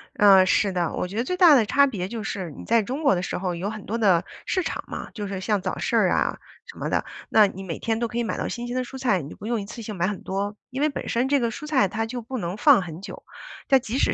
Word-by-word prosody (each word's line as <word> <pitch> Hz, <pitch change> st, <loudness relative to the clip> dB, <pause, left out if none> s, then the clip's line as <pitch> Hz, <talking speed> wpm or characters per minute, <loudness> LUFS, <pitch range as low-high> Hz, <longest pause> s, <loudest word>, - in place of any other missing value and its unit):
呃， 195 Hz, -2 st, +7 dB
是 195 Hz, +2 st, +2 dB
的， 175 Hz, -3 st, -1 dB
我 -, -, -2 dB
觉 190 Hz, -, -9 dB
得 230 Hz, -, +1 dB
最 365 Hz, +8 st, -3 dB
大 340 Hz, -6 st, +8 dB
的 230 Hz, -, +4 dB
差 280 Hz, +7 st, +4 dB
别 190 Hz, -8 st, -3 dB
就 225 Hz, +1 st, -5 dB
是， 190 Hz, -4 st, -4 dB
你 -, -, -10 dB
在 230 Hz, 0 st, +3 dB
中 265 Hz, +9 st, -4 dB
国 275 Hz, -, +4 dB
的 175 Hz, -, -1 dB
时 -, -, -3 dB
候 180 Hz, -1 st, -2 dB
有 185 Hz, +4 st, -3 dB
很 215 Hz, -2 st, -7 dB
多 225 Hz, -, -2 dB
的 190 Hz, -6 st, +3 dB, 0.2 s
市 370 Hz, -, 0 dB
场 -, -, -4 dB
嘛， -, -, -6 dB
就 210 Hz, -3 st, -5 dB
是 195 Hz, -1 st, -4 dB
像 205 Hz, +1 st, 0 dB
早 185 Hz, -, -3 dB
市 -, -, -1 dB
啊， -, -, +1 dB, 0.3 s
什 -, -, -12 dB
么 -, -, -3 dB
的， -, -, 0 dB, 0.2 s
那 215 Hz, -2 st, +6 dB
你 195 Hz, 0 st, -8 dB
每 170 Hz, -4 st, -5 dB
天 225 Hz, -1 st, -1 dB
都 235 Hz, -, 0 dB
可 230 Hz, -, -6 dB
以 240 Hz, -, +1 dB
买 225 Hz, -, -3 dB
到 -, -, -2 dB
新 240 Hz, 0 st, -5 dB
鲜 245 Hz, -, -4 dB
的 255 Hz, -, 0 dB
蔬 265 Hz, +2 st, -9 dB
菜， 235 Hz, -9 st, +1 dB
你 145 Hz, +2 st, -8 dB
不 205 Hz, -, -11 dB
用 230 Hz, -1 st, -1 dB
一 -, -, -6 dB
次 230 Hz, +3 st, -8 dB
性 215 Hz, -1 st, -6 dB
买 175 Hz, 0 st, 0 dB
很 205 Hz, -2 st, -4 dB
多， 200 Hz, +2 st, -3 dB, 0.2 s
因 265 Hz, +3 st, -3 dB
为 305 Hz, -, +3 dB
本 280 Hz, -, -6 dB
身 240 Hz, +3 st, +1 dB
这 285 Hz, 0 st, +3 dB
个 235 Hz, -2 st, 0 dB
蔬 300 Hz, +7 st, -7 dB
菜 265 Hz, -10 st, +3 dB
它 225 Hz, +4 st, -2 dB
就 245 Hz, +2 st, -5 dB
不 255 Hz, +3 st, -6 dB
能 175 Hz, -1 st, -4 dB
放 270 Hz, -4 st, +6 dB
很 170 Hz, -1 st, -8 dB
久。 200 Hz, -, -9 dB, 0.4 s
但 270 Hz, -2 st, +5 dB
即 235 Hz, 0 st, -4 dB
使 -, -, +2 dB
215 Hz, 325 characters per minute, -24 LUFS, 190-245 Hz, 0.4 s, 大